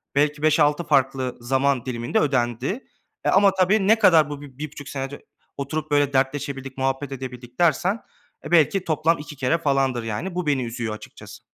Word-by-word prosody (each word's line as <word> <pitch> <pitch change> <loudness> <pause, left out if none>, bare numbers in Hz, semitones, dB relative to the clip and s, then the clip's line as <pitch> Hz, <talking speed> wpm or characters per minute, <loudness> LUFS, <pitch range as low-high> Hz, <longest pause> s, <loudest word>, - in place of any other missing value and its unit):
belki 145 +1 +1
5-6 155 +1 +3
farklı 135 -4 +1
zaman 130 +1 +1
diliminde 120 -2 -1
ödendi, 130 - -1 0.4
e, - - +3
ama 200 0 +5
tabii 195 +2 +2
ne 220 +1 +5
kadar 160 -8 +5
bu 145 -1 -6
b 135 -3 -13
bir 150 0 -5
buçuk 145 -1 -9
sene 135 -1 -3
ö - - -13 0.4
oturup, 150 +2 -4
böyle, 145 -1 +2
dertleşebildik, 135 0 -2
muhabbet 135 +1 -1
edebildik 125 -2 -8
dersen 175 +6 +2 0.5
belki 175 +3 +4
toplam 160 +1 +2
2 150 0 -9
kere 135 +4 +1
falandır, 135 -6 0
yani, 115 - -4
bu 180 -3 -2
beni 140 -3 +1
üzüyor 115 -2 -4
açıkçası. - - -12
140 Hz, 170 wpm, -23 LUFS, 130-155 Hz, 0.5 s, ama